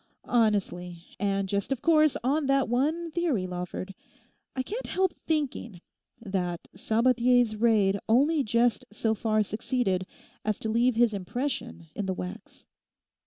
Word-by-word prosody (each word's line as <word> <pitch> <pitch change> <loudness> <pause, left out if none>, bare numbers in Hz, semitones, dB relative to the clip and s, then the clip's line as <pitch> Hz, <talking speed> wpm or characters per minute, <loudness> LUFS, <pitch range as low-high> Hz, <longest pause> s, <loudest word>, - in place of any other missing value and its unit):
Honestly, 190 -7 0 0.2
and 195 -1 0
just 200 +5 -2
of 265 -2 -2
course 310 -3 +4
on 280 +3 +1
that 275 -1 +3
one 310 +8 0
theory, 305 - 0
Lawford, 180 +1 -5 0.6
I 260 - -1
can't 445 - -5
help 375 -2 +1
thinking 275 - -3 0.4
that 185 -6 -3
Sabathier's 240 +2 +3
raid 210 -3 +3
only 285 +6 +4
just 235 +1 +2
so 220 +1 0
far 215 0 +1
succeeded 210 -3 -1 0.4
as 215 -1 0
to 220 - -2
leave 235 +2 +2
his 235 -1 +3
impression 200 -2 -3
in 205 - -3
the 190 - -1
wax. 185 +5 -8
225 Hz, 135 wpm, -28 LUFS, 195-265 Hz, 0.6 s, course